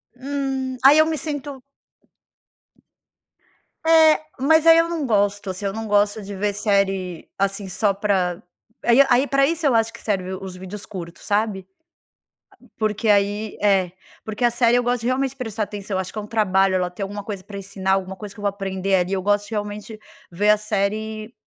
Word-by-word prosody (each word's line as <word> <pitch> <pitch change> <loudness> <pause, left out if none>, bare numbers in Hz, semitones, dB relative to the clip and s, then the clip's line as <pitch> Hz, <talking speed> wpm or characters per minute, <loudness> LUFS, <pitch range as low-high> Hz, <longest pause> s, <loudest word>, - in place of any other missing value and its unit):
Hum. 265 -1 -3
Aí 280 +3 +8
eu 310 - +6
me 320 0 -1
sinto 285 -2 -5 2.2
É, 320 -1 +6 0.2
mas 315 +4 +4
aí 330 0 +9
eu 330 0 +3
não 330 -4 -2
gosto, 205 -3 0
assim, 185 +2 -5
eu 195 - -1
não 220 +1 -5
gosto 205 +1 +2
de 200 0 -7
ver 205 +1 -1
série, 195 -4 -1
assim, 195 0 -1
só 200 +2 +1
pra, 190 -3 0 0.4
aí 240 +3 +6
aí 250 +2 +4
para 275 0 +3
isso 330 0 -2
eu 275 - +4
acho 225 0 +2
que - - -11
serve 190 -3 -2
os 190 -1 -7
vídeos 190 +2 -8
curtos, 170 -3 -9
sabe, 205 -2 0 1.0
a - - -19
porque 215 +1 -1
aí 205 +1 +1
é, 190 -4 +2 0.3
porque 220 +3 -4
a 240 - +5
série 240 0 +3
eu 245 - +2
gosto 245 -1 -1
realmente 260 +2 0
de 270 - -15
prestar 225 -4 -4
atenção, 200 -2 -4
acho 190 -1 -4
que - - -7
é - - -3
um - - -9
trabalho 195 -3 +2
ela 180 -1 0
ter 180 +3 -8
alguma 205 +1 -4
coisa 200 -3 -6
pra 200 - -9
ensinar, 195 -1 -2
alguma 190 0 -1
coisa 205 0 -9
que 210 - -12
eu - - -10
vou 205 - +2
aprender 195 -1 -1
ali, 180 +1 0
eu 190 -1 -1
gosto 205 +1 +1
realmente 210 0 -5 0.3
ver 205 +5 +2
a 210 - +6
série 215 +1 -2
210 Hz, 195 wpm, -22 LUFS, 195-240 Hz, 2.2 s, aí